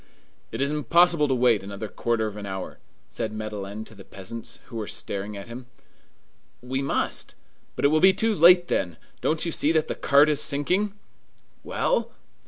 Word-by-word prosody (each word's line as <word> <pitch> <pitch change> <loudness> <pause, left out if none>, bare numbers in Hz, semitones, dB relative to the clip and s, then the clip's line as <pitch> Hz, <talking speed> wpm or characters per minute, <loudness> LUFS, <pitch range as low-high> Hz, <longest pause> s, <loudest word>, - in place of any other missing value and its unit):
"It - - -1
is 140 - 0
impossible 165 +1 +3
to 135 - +1
wait 120 -4 +3
another 100 +2 -6
quarter 115 +1 -1
of 105 -1 -5
an 105 -1 -7
hour," 95 -1 -6 0.3
said 110 - -4
Madeleine 110 -1 -6
to - - -14
the 100 -2 -13
peasants, 100 +5 -8
who 115 - -9
were 110 -2 -4
staring 100 +1 -4
at 100 - -9
him. 120 +2 -9 0.9
"We 130 +2 -3
must!" 140 - -2 0.4
"But - - -1
it - - +6
will 155 +1 +3
be 190 - +8
too 220 +4 0
late 175 0 +6
then! 85 - -1 0.2
Don't 160 +2 0
you 170 - -1
see 155 0 +2
that 160 -1 +1
the - - -2
cart 145 +1 +4
is 150 -2 +1
sinking?" 180 +8 +1 0.7
"Well!" - - 0
125 Hz, 185 wpm, -25 LUFS, 105-155 Hz, 0.9 s, be